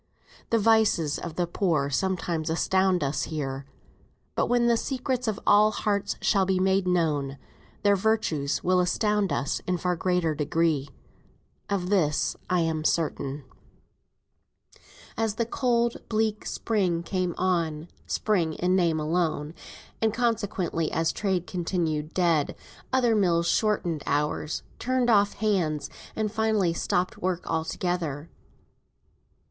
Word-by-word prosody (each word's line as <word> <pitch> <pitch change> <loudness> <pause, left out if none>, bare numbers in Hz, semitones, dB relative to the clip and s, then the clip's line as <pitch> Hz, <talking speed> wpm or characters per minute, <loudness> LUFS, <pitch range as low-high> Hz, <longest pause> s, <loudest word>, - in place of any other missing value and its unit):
The 230 - +3
vices 215 -9 +3
of 170 -2 -6
the 175 - +1
poor 165 -5 0
sometimes 170 -1 -1
astound 185 +1 +2
us 140 +1 -1
here; 135 -3 -4 0.7
but - - 0
when 240 -1 +2
the 235 0 +4
secrets 255 0 -2
of 215 -2 -1
all 210 +1 +6
hearts 205 -1 -1
shall 195 -3 +3
be 190 0 +1
made 190 0 +2
known, 150 -6 0 0.5
their 205 -1 +5
virtues 185 -9 0
will 185 0 +3
astound 210 +2 +1
us 140 - -1
in 180 -1 +1
far 180 +1 0
greater 180 -2 +1
degree. 150 -1 0 0.8
Of 190 -2 -1
this 155 -7 +2
I 180 -1 +2
am 160 -1 -1
certain. 145 -3 -1 1.7
As 220 -2 0
the 230 - 0
cold 235 -1 +1
bleak 215 -1 0
spring 185 -7 0
came 180 -1 -2
on 170 -4 0 0.2
(spring, 175 -7 0
in 180 +1 +1
name 170 -4 +2
alone), 155 -1 -1 0.5
and 220 -1 +3
consequently 205 -8 -1
as 165 0 +1
trade 190 -4 -1
continued 165 -4 -2
dead, 170 -5 +2 0.4
other 245 -3 +3
mills 170 -4 +2
shortened 175 -8 +1
hours, 150 +1 -1 0.2
turned 255 -1 +1
off 205 -1 +4
hands, 180 -9 0 0.2
and 215 -1 -1
finally 220 -5 +1
stopped 180 +2 -1
work 180 -1 -2
altogether. 160 -2 -2
180 Hz, 130 wpm, -26 LUFS, 160-210 Hz, 1.7 s, all